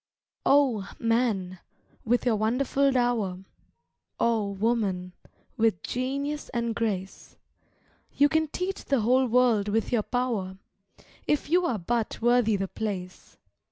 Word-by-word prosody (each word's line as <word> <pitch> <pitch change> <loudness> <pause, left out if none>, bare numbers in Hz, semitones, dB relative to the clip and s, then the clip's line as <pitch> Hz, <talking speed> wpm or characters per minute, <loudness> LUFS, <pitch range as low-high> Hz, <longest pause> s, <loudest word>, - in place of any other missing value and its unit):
Oh, 255 -9 +3
man, 225 -6 0 0.5
with 245 +3 +1
your 240 -3 +3
wonderful 260 +6 +1
dower, 230 -8 0 0.8
Oh, 225 -3 +1
woman, 200 -3 -1 0.4
with 220 -6 +1
genius 280 +4 -3
and 235 -1 0
grace, 200 -5 -4 0.7
You 285 - +4
can 315 +1 +1
teach 365 +6 -4
the 275 -4 +1
whole 255 +4 +3
world 235 -4 +3
with 220 +2 0
your 235 -3 +2
power, 215 -6 -2 0.7
If 295 0 0
you 355 0 +3
are 235 - -1
but 225 +4 -2
worthy 240 -2 +3
the 195 -1 -2
place. 190 -4 -6
230 Hz, 125 wpm, -27 LUFS, 205-255 Hz, 0.8 s, You